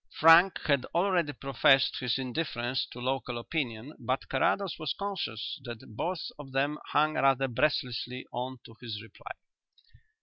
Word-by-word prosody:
Frank 165 +4 +7
had 140 -4 +2
already 175 -4 +2
professed 135 0 +3
his 125 -2 0
indifference 130 -2 -2
to - - -10
local 125 -1 -2
opinion, 120 0 -3
but 130 +1 -2
Carrados 185 +8 +1
was 155 -3 -2
conscious 190 - -4
that 120 -3 -9
both 175 +7 -3
of 135 -3 -10
them 145 +3 0
hung 155 +1 +2
rather 135 -2 +3
breathlessly 125 -1 -1
on 130 +1 -4
to 115 - -13
his 115 -4 -5
reply. 110 - -10
135 Hz, 140 wpm, -29 LUFS, 125-155 Hz, -, Frank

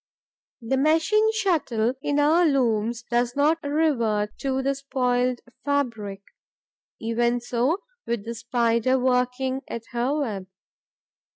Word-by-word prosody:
The 235 +4 0
machine 325 +10 +3
shuttle 310 - +1
in 290 0 0
our 310 +4 +4
looms 240 -6 +1
does 240 0 0
not 305 +3 +2
revert 235 -9 0
to 265 -1 -1
the 275 +1 +1
spoiled 250 -2 0 0.2
fabric; 230 -9 -2 0.8
even 235 +1 +1
so 250 - -1 0.2
with 235 -3 -2
the 230 - -4
Spider 235 +1 +1
working 255 +1 0
at 235 - -5
her 250 +4 0
web. 200 -8 -4
250 Hz, 115 wpm, -25 LUFS, 235-285 Hz, 0.8 s, our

